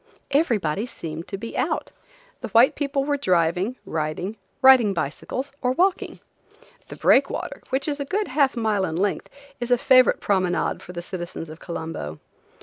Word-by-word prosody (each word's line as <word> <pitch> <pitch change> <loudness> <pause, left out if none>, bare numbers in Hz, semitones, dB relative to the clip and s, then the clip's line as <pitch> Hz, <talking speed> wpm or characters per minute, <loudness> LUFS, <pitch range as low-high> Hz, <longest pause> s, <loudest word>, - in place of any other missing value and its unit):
Everybody 230 - +1
seemed 165 -7 -7
to 195 - -5
be 230 +3 -7
out. - - -1 0.5
The - - -5
white 235 +2 +5
people 280 -1 -1
were 290 0 0
driving, 180 - +1
riding, 160 +6 -3 0.2
riding 255 -7 +6
bicycles, 250 - -4
or 250 -1 +1
walking. 370 +6 0 0.7
The - - -9
breakwater, - - +2
which 265 +3 -1
is 295 -1 -2
a 280 - -2
good 400 +4 -1
half 270 -1 +2
mile 215 -4 +1
in 160 -3 -4
length, 195 +3 -1 0.3
is 240 0 -4
a 245 - +4
favorite 255 -1 +5
promenade 185 -3 0
for - - -10
the 175 -1 -6
citizens 175 -3 -6
of 155 - -11
Colombo. 160 - -6
215 Hz, 160 wpm, -24 LUFS, 175-265 Hz, 0.7 s, riding